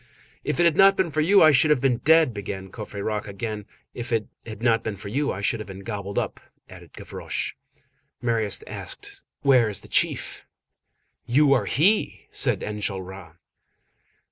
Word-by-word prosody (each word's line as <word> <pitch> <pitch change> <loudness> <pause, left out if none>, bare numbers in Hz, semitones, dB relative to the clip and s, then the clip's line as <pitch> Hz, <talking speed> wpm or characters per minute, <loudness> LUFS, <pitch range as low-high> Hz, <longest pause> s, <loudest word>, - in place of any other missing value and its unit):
"If - - -2
it - - +5
had 170 -3 +4
not 195 +1 +6
been 185 -4 +1
for 155 +1 +1
you, 195 +5 +6
I 155 - +8
should 145 +3 +4
have 150 -3 +4
been 130 -2 +2
dead!" 160 -4 +4
began 95 -2 -6
Courfeyrac 105 -1 -4
again. 105 +1 -5 0.3
"If 120 0 -6
it 110 -2 +1 0.2
had 110 0 -8
not 115 -2 +3
been 110 -2 -4
for 100 +1 -8
you, 140 +6 0
I 95 - -5
should 115 +2 0
have 105 - -7
been 95 0 -9
gobbled 100 -2 -5
up!" - - -2 0.3
added - - -14
Gavroche. - - -4 0.7
Marius 115 -4 0
asked:— - - -6 0.2
"Where 130 -5 +5
is 100 - -5
the - - -14
chief?" - - 0 0.9
"You 140 +3 +4
are 130 - +2
he!" 195 - +1
said - - 0
Enjolras. 95 -4 -5
115 Hz, 170 wpm, -24 LUFS, 100-145 Hz, 0.9 s, I